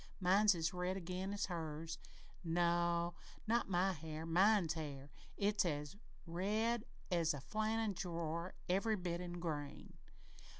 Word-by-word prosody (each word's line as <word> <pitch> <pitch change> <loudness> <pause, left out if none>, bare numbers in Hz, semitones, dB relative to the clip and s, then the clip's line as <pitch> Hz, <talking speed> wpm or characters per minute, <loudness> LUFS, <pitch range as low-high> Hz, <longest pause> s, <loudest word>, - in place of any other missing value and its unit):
Mine's 195 +2 +5
as 165 0 0
red 180 +1 -1
again 185 +1 -3
as 205 0 0
hers. 160 -2 -4 0.4
No, 170 0 +2 0.3
not 230 -1 +2
my 190 +1 +3
hair 160 -1 -6
mine's 185 +1 +4
hair. 145 -3 -6 0.3
It's 205 +1 +3
as 150 0 -2 0.3
red 210 +7 0 0.3
as 165 -3 +3
a - - -5
flannen 215 - 0
drawer, 170 -1 -3
every 200 +5 +2
bit 175 -3 -2
an' 175 -1 -5
grain! 155 -5 -4
175 Hz, 130 wpm, -38 LUFS, 165-195 Hz, 0.4 s, Mine's